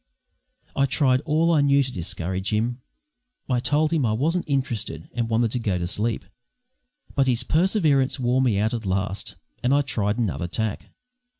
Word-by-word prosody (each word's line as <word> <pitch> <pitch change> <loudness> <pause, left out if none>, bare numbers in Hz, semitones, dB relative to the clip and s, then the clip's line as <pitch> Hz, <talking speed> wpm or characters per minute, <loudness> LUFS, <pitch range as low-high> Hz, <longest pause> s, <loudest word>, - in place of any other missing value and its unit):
I 140 - +3
tried 130 -1 +2
all 160 +2 +2
I 155 -3 +4
knew 140 0 +4
to 130 - -5
discourage 95 +1 -3
him. 120 +4 -1 0.7
I 125 -2 +1
told 150 +6 +1
him 155 -4 +2
I 110 -3 +1
wasn't 160 +10 0
interested 130 -6 -2
and 115 -1 -2
wanted 115 0 +1
to 125 - -1
go 100 -6 0
to 85 - -2
sleep; 105 +3 -1 0.9
but 135 -1 +2
his 125 -1 +1
perseverance 155 - +2
wore 125 +1 +2
me 120 -6 +2
out 110 +3 +1
at 115 -4 -3
last, 95 +1 -2 0.3
and 125 +3 +2
I 145 - +3
tried 105 -5 -1
another 100 -7 -1
tack. 110 +3 -3
120 Hz, 175 wpm, -24 LUFS, 105-140 Hz, 0.9 s, I